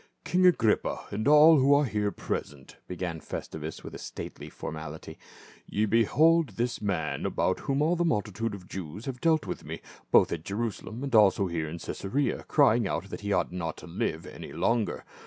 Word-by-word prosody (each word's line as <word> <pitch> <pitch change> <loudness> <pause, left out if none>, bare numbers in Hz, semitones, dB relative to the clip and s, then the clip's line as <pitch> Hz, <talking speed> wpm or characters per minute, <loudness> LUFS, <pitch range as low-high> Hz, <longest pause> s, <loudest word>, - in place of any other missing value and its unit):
" - - -48
King 185 +1 +4
Agrippa, 115 -11 +2
and 110 +5 -2
all 150 +1 +8
who 140 +2 +5
are 145 +1 +3
here 105 -4 -1
present," 70 -8 -5
began 90 -2 -4
Festus 80 0 -6
with - - -8
stately - - -7
formality, 80 0 -7 0.5
"ye 105 - 0
behold 145 +6 +3
this 120 0 -1
man 90 -7 -2
about - - 0
whom 140 +2 0
all 165 +3 +2
the 175 - +1
multitude 110 - -1
of 100 - -10
the 90 - -18
Jews 95 +3 -7
have 130 -2 -5
dealt 160 -2 +3
with - - -5
me, - - -6 0.3
both - - +5
at 80 -2 -3
Jerusalem 110 +4 -4
and 140 - -4
also 100 -3 +5
here 85 -3 -2
at 85 +2 -7
Caesarea, 135 +9 -2
crying 120 -7 +4
out 85 +5 -3
that - - -6
he 100 0 -3
ought - - +1
not 85 -2 -4
to - - -11
live 80 -1 -3
any - - -9
longer. 115 -2 0
105 Hz, 190 wpm, -28 LUFS, 90-135 Hz, 0.5 s, all